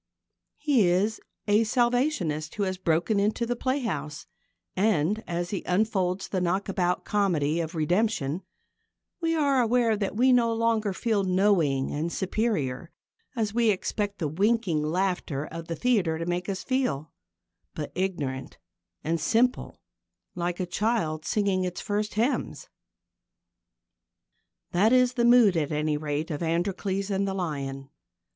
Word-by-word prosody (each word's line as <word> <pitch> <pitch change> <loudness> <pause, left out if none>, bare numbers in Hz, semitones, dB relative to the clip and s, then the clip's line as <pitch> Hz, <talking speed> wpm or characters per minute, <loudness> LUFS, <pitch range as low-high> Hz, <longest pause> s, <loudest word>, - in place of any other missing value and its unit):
He 275 - +3
is 195 +5 +1 0.3
a 210 +2 +4
Salvationist 240 - 0
who 205 - -1
has 185 -1 -2
broken 175 +4 +1
into 215 +4 +1
the 245 +1 -1
playhouse, 230 - -3 0.5
and, 205 +1 +1
as 175 0 -3
he 200 - -2
unfolds 190 -1 0
the 185 - -2
knockabout 180 0 0
comedy 170 -7 +1
of 165 +1 -4
redemption, 175 -1 0 0.8
we 330 0 +1
are 280 -4 +3
aware 235 -1 +2
that 205 -1 -3
we 255 +2 +5
no 235 -2 +3
longer 225 -2 +1
feel 210 +1 0
knowing 180 -8 +2
and 160 +4 -2
superior, 180 - -1 0.5
as 215 -3 -1
we 235 -1 +3
expect 205 +1 -1
the 160 - -1
winking 195 0 +1
laughter 165 -3 -1
of 165 +1 -8
the 165 - -3
theatre 190 -6 +1
to 165 - -4
make 175 +2 -2
us 190 -1 -3
feel, 250 - -1 0.6
but 150 - -5
ignorant 150 -8 -3 0.5
and 165 0 -1
simple, 240 +9 +1 0.6
like 175 0 -3
a 185 - 0
child 175 -5 -1
singing 195 -1 +1
its 180 -1 -3
first 210 +1 -2
hymns. 235 +6 -1 2.0
That 200 +6 +3
is 250 -1 +4
the 240 -2 +1
mood, 240 -6 +6
at 155 -3 0
any 150 0 0
rate, 150 +1 -3
of 150 - -4
Androcles 190 +4 -1
and 195 0 0
the 190 - -2
Lion. 135 -6 -4
190 Hz, 140 wpm, -27 LUFS, 165-225 Hz, 2.0 s, mood